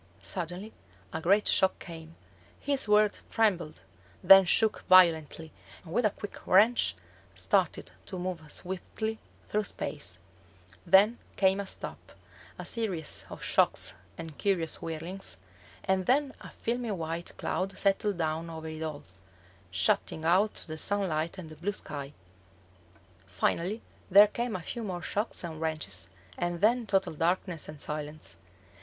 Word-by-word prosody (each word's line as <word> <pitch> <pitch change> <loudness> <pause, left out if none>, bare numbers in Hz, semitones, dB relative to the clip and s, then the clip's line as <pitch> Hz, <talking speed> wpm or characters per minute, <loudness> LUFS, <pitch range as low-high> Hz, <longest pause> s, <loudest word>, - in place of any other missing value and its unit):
Suddenly 180 - -3 0.4
a 160 - -3
great 200 +5 +3
shock 190 0 +3
came: 165 -1 -10 0.4
his 280 -4 0
World 210 0 +4
trembled, 180 - 0 0.4
then 195 -1 +9
shook 220 +4 +3
violently, 165 -3 +5 0.3
and, 165 -2 -9
with 235 0 +3
a - - +1
quick 205 0 -8
wrench, 220 +6 +5 0.4
started - - +1 0.2
to 190 - -5
move 180 -2 -3
swiftly 220 +4 -4 0.3
through 210 0 0
space. - - -3 0.7
Then 210 +5 +6 0.2
came 190 0 +3
a 200 - -4
stop, - - -7 0.4
a - - -7
series 190 -10 -1
of - - -9
shocks - - +2 0.2
and 160 -3 -8
curious 180 -6 +1
whirlings, 165 +4 -4 0.5
and 190 -1 0
then 275 +1 +2
a - - -9
filmy 240 0 -3
white 170 -3 -4
cloud 195 +1 -2
settled 200 0 +1
down 160 0 -2
over 160 -1 -6
it 155 0 -7
all, 155 -2 -4 0.7
shutting 95 - 0
out 190 +6 +2
the 155 -1 -4
sunlight 170 -4 -1
and 165 -4 -8
the - - -9
blue 185 +7 -2
sky. 145 -5 -5 1.1
Finally 170 - -1 0.3
there 200 +2 +9
came 235 +2 -3
a 180 - -5
few 235 - -5
more 180 -4 -4
shocks 210 +2 -2
and 160 -2 -6
wrenches, 155 - -2 0.3
and 175 0 -1
then 230 +3 +3
total 195 -3 +1
darkness 170 +1 -1
and 150 -1 -9
silence. 150 +1 -4
180 Hz, 140 wpm, -29 LUFS, 160-205 Hz, 1.1 s, then